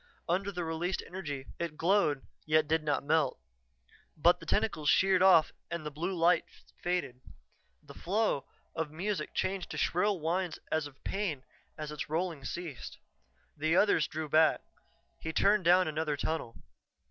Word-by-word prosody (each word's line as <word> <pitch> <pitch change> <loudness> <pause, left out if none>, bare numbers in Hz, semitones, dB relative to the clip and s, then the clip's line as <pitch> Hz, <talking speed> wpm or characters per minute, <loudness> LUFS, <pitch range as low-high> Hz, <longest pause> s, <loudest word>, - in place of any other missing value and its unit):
Under 190 +4 0
the 180 -2 -3
released 165 +3 -2
energy 150 -8 -6
it 165 -3 -4
glowed, 165 -6 +2 0.2
yet 155 0 +3
did 160 +1 +1
not 150 -2 0
melt. 150 -2 +1 0.8
But - - +4
the - - -12
tentacles 150 -1 +1
sheared 190 -1 +4
off 180 -5 +6 0.2
and 170 -2 -4
the 150 - -4
blue 175 +6 -3
lights 170 0 +1
faded. 175 -8 -2 0.6
The - - -12
flow 200 -6 0 0.3
of 160 -2 -2
music 185 +7 -3
changed 190 -2 -1
to - - -6
shrill 190 +2 +1
whines 175 +3 -1
as 155 -2 0
of 135 -2 -18
pain 185 -10 -2 0.3
and 155 -1 -5
its 150 -1 -5
rolling 165 -2 -2
ceased. 170 -5 -6 0.6
The 155 +2 +1
others 185 -5 +4
drew 155 0 -4
back; 155 +2 +4 0.6
he 160 - -4
turned 200 +3 +3
down 180 +1 +5
another 155 -1 -1
tunnel. 150 -6 -3
160 Hz, 155 wpm, -31 LUFS, 150-185 Hz, 0.8 s, off